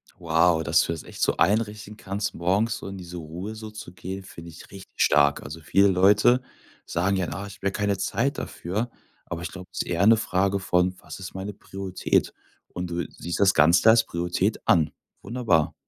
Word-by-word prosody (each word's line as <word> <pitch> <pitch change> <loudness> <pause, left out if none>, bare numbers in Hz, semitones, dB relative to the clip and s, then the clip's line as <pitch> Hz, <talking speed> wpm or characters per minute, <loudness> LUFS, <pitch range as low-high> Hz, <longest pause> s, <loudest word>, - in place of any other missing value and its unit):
Wow, 80 0 +2
dass 75 +1 +3
du - - -2
das 80 - -7
echt - - -10
so - - +2
einrichten 105 +1 0
kannst, 100 +1 -3
morgens 100 +6 0
so - - -8
in 95 0 -7
diese 90 -1 -8
Ruhe 85 +7 -6
so 110 0 -8
zu 105 -4 -10
gehen, 95 +2 -7
finde 85 -2 -11
ich 80 - -12
richtig 95 -1 -12
stark. 70 -1 +3
Also 75 +5 -8
viele 95 +6 +4
Leute 105 +7 +4 0.4
sagen 95 +3 0
ja: 90 -2 -1
„Ah, 100 - -5
ich 100 - -11
habe 100 - -3
ja - - +1
keine 100 0 0
Zeit - - -1
dafür“, 105 +8 -3 0.4
aber 85 0 -5
ich 85 - -5
glaube, 95 -1 -9
das - - -2
ist - - -5
eher 90 +3 +1
'ne 115 0 +7
Frage 100 -1 0
von: 90 -1 +1
„Was - - -10
ist 95 - -8
meine 95 +2 -5
Priorität?“ 95 -1 -1 0.4
Und 90 0 -4
du 85 0 -2
siehst 85 +1 -5
das 100 -1 +5
Ganze 85 +7 +5
als 115 0 +6
Priorität 90 +4 -1
an. 80 -3 +4 0.3
Wunderbar. 110 -11 +1
95 Hz, 205 wpm, -25 LUFS, 85-100 Hz, 0.4 s, ne